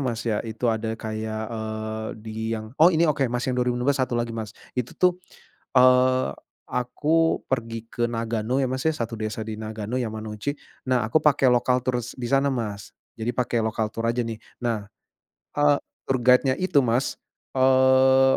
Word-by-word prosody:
Mas 120 -4 -2
ya. 110 -3 0
Itu 115 +1 -1
ada 110 0 -2
kayak, 110 0 -4
eee, 110 0 -4 0.2
di 110 -1 -7 0.2
yang 110 +1 -8
oh 170 - +9
ini 170 -1 +3
oke 145 -4 +2
Mas 125 +1 -2
yang 130 - 0
2025, 125 +2 +1
satu 130 -3 -1
lagi, 120 -1 -1
Mas. 110 -2 -6 0.2
Itu 125 -2 -4
tuh, 180 -1 +4 0.6
eee, 130 - +5 0.4
aku 150 +6 +1
pergi 115 -3 -3
ke 120 0 -1
Nagano 115 +1 -1
ya - - +2
Mas 130 +2 -3
ya, - - +2
satu 115 -3 -3
desa 110 +1 -3
di 110 0 -5
Nagano, 110 +2 -4
Yamanouchi, 110 +3 -4 0.3
nah 125 -3 +2
aku 115 +8 +2
pake 145 -2 +3
local 125 +1 +2
tours 125 -2 -2
di 125 - -6
sana 135 +2 +3
Mas, 105 -7 -4 0.3
jadi 115 +2 -1
pakai 120 -2 +1
lokal 110 -1 -1
tour 115 0 -2
aja 120 +1 0
nih 115 -1 -5 0.2
nah, 115 -4 -2 0.7
eee, 145 0 +5 0.3
tour 135 - +3
guide-nya 125 +2 +5
itu 185 -6 +3
Mas, 125 +1 0 0.3
eee, 130 0 +5
120 Hz, 175 wpm, -25 LUFS, 110-130 Hz, 0.7 s, oh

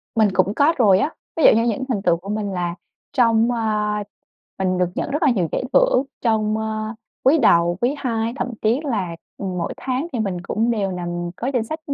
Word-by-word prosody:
Mình 220 -2 +4
cũng 185 +2 +2
có 300 +4 +4
rồi 200 -7 +5
á. 290 - +1 0.3
Ví 320 - +1
dụ - - +9
như 230 - +3
những 230 +4 -2
thành 220 -6 0
tựu 175 -3 +2
của 195 +4 -10
mình 210 -1 -2
là 175 -2 -2 0.4
trong, 230 -3 +3
ơ 215 -3 0 0.7
mình 185 -1 0
được 180 -1 +2
nhận - - -3
rất 295 +4 -2
là 290 - +5
nhiều 180 -8 0
giải - - -1
thưởng - - +4 0.2
trong, 215 -2 +1
ơ, 220 0 -3 0.3
quý 285 +5 +5
đầu, 170 - +4
quý 245 +4 +1
hai, 230 -3 -1
thậm - - -2
chí 230 +6 +2
là, 195 - -2 0.2
ừm, 185 -2 -4
mỗi 170 - -2
tháng 265 +4 -2
thì 240 - -2
mình 190 -4 -2
cũng 225 +6 -1
đều 200 -5 -1
nằm 175 -1 -4
có 240 - -4
danh 235 - +1
sách 315 +7 -5
215 Hz, 220 wpm, -21 LUFS, 185-245 Hz, 0.7 s, dụ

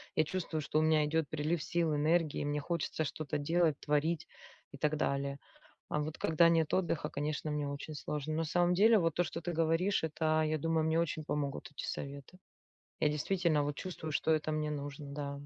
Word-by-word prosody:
Я 155 - +3
чувствую, 165 -2 -3
что 150 +1 0
у - - +3
меня 155 -1 +4
идет 160 0 0
прилив 155 +1 -1
сил, 165 -3 +1
энергии, 155 +1 +2
мне 145 0 -1
хочется 160 0 -2
что-то 150 -1 -3
делать, 160 +1 +2
творить, 150 +2 0 0.5
и - - -8
так 150 +2 +1
далее. 140 -1 -1 0.5
А - - -1
вот 150 +1 -3
когда 160 +1 +4
нет 165 -2 +2
отдыха, 170 -4 0
конечно, 150 +1 -2
мне 150 -1 -1
очень 140 +2 -6
сложно. 150 +1 -3
На 165 - 0
самом 175 +3 +2
деле, 220 +4 +6
вот 165 -2 +1
то, 175 - +2
что 165 0 -5
ты 175 - -3
говоришь, 165 +4 +1
это, 155 0 +1
я 155 0 0
думаю, 160 +1 +1
мне 160 +1 +2
очень 155 -2 -2
помогут 145 -1 -3
эти - - -6
советы. 140 +5 -6 0.6
Я 150 - +4
действительно 155 0 +1
вот 145 0 -2
чувствую, 165 -4 -5
что 160 - +1
это 155 0 -1
мне 155 0 -1
нужно, 145 0 -5
да. 140 -1 -3
155 Hz, 200 wpm, -33 LUFS, 150-165 Hz, 0.6 s, деле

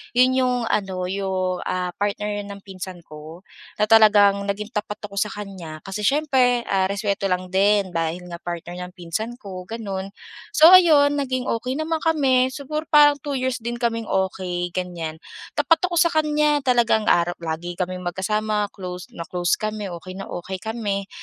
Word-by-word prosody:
Yun 255 +1 +5
yung 250 -1 +2 0.2
ano, 190 -3 -1
yung, 185 -1 -2
ah, 180 -1 -2
partner 205 0 -2
ng 200 -1 -9
pinsan 185 -2 -8
ko 155 +3 -11 0.3
na 210 - 0
talagang 205 -2 +5
naging 210 +2 -3
tapat 210 -2 -4
ako 200 -1 -4
sa 210 - +1
kanya. 185 -6 -8
Kasi 195 +2 -6
siyempre, 255 -1 +2
ah, 190 -3 +1
respeto 200 0 -1
lang 180 -1 -2
din 200 0 +3
dahil 165 +1 -2
nga 170 - -6
partner 175 +1 -6
ng 180 - -17
pinsan 185 +7 -4
ko, 190 -6 -9
ganun. 195 -4 -5 0.5
So, 320 +3 +8
ayun, 295 -6 +6
naging 255 -2 -1 0.2
okey 255 +2 -3
naman 315 +2 -1
kami. 275 -6 +3
Siguro 300 +4 -5
parang 295 -1 +6
two 285 +1 -4
years 255 -1 -1
din 235 +1 -4
kaming 230 -2 -2
okey, 180 -2 -2
ganyan. 170 -3 -4 0.4
Tapat 330 0 +3
ako 345 -2 0
sa 340 - +6
kanya, 300 -2 +2
talagang 230 -3 +3
araw 175 0 +3
lagi 165 +2 -4
kaming 180 +1 -4
magkasama, 210 +3 -1
close 180 -3 -8
na 170 - -8
close 175 0 0
kami, 215 -2 -4
okey 180 +1 -8
na 195 +1 -8
okey 185 +1 -6
kami, 205 -3 -3
200 Hz, 170 wpm, -22 LUFS, 185-250 Hz, 0.5 s, So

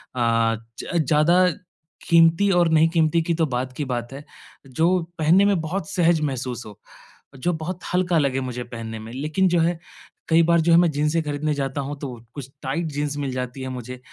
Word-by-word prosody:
अ, 115 -2 +2 0.2
ज 170 -3 -1
ज़्यादा 170 +4 +4 0.6
क़ीमती 165 +4 +5
और 175 -1 +4
नहीं 160 +1 +4
क़ीमती 165 0 +2
की 170 +1 -1
तो 165 - +1
बाद 130 -2 -3
की 145 - -2
बात 120 0 -4
है। 140 +2 -8 0.4
जो 160 +6 +1 0.3
पहनने 170 +6 +4
में 200 -3 +2
बहुत 160 +1 -4
सहज 170 -3 +2
महसूस 130 -4 -3
हो। 105 -1 -12 0.6
जो 175 +7 -1
बहुत 170 +3 -5
हल्का 180 -2 +2
लगे 135 -3 +1
मुझे 125 -1 -4
पहनने 115 -2 -7
में। 110 +1 -9
लेकिन 155 +8 0
जो 175 -1 +2
है 170 0 0 0.5
कई 165 0 +5
बार 170 0 +3
जो 170 +1 +2
है - - +7
मैं 175 -1 +4
जिन्सें 150 +3 0
खरीदने 150 +1 -2
जाता 140 0 -2
हूँ 145 +2 -5
तो 135 -4 -6 0.2
कुछ 135 -3 -7
टाइट 140 +5 -2
जिन्स 145 0 -2
मिल 140 -2 -3
जाती 125 +1 -5
है 130 - -4
मुझे। 125 0 -7
150 Hz, 200 wpm, -23 LUFS, 130-170 Hz, 0.6 s, है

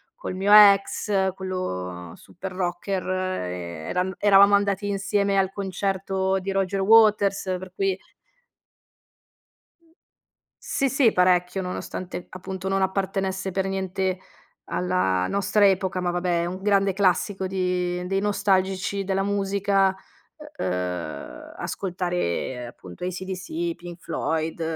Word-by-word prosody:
col 475 - -6
mio 195 +2 0
ex 200 -1 +5
quello 90 - -5
super 190 +2 -9
rocker 185 +1 -2
ehm, 90 - -3
era 185 +1 -1
eravamo 200 0 +6
andati 200 0 0
insieme 200 0 0
al 190 -1 +2
concerto 190 0 -1
di 195 +1 -4
Roger 195 0 0
Waters 210 -1 +5 0.2
per 185 0 -9
cui 195 -1 0 2.7
Sì, 275 - 0
sì 265 -4 +4
parecchio, 180 +1 +2
nonostante 180 0 -6
appunto 190 +1 -6
non 195 0 +1
appartenesse 190 0 -1
per 190 +1 -1
niente 190 -1 -2 0.5
alla 135 - 0
nostra 200 +1 +2
epoca, 190 -2 +1
ma 175 -1 0
vabbè 175 -1 0
è - - -1
un 185 +2 -5
grande 195 -1 +2
classico 190 0 +1
di 180 -1 -1
dei 195 +1 0
nostalgici 195 -1 0
della 195 0 0
musica 195 -1 +1 0.6
u - - -1
uhm, 90 -3 -4
ascoltare 175 - -3
appunto 90 - -11
ACDC, 185 -2 -4
Pink 175 +1 -10
Floyd, 160 0 -2
190 Hz, 115 wpm, -24 LUFS, 180-195 Hz, 2.7 s, eravamo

